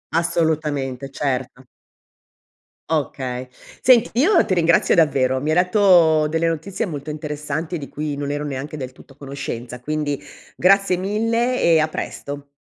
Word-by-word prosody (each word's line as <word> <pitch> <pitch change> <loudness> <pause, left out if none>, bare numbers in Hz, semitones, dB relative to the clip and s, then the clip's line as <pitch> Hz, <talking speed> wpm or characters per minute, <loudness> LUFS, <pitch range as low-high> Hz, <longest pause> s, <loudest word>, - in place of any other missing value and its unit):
Assolutamente, 150 -6 -1
certo. 135 -1 -3 1.3
Okay. 130 -5 -2 0.3
Senti 245 -2 +5
io 345 +6 +5
ti - - 0
ringrazio 170 -2 +3
davvero. 130 -5 +2
Mi 150 +4 -1
hai - - +2
detto 180 -4 +4
delle 160 +2 0
notizie 165 +6 -2
molto 150 -5 -6
interessanti, 150 +2 -4
di 140 -3 -7
cui 150 -1 -4
non 145 0 -3
ero 145 +1 -2
neanche 145 +1 -5
del 130 -3 -6
tutto 135 - -18
a - - -28
conoscenza, 130 -3 -6
quindi 145 +1 -2 0.3
grazie 195 0 +3
mille 230 +6 0
e 165 -1 +5
a 155 - +2
presto. 145 -2 -6
155 Hz, 145 wpm, -21 LUFS, 140-170 Hz, 1.3 s, Senti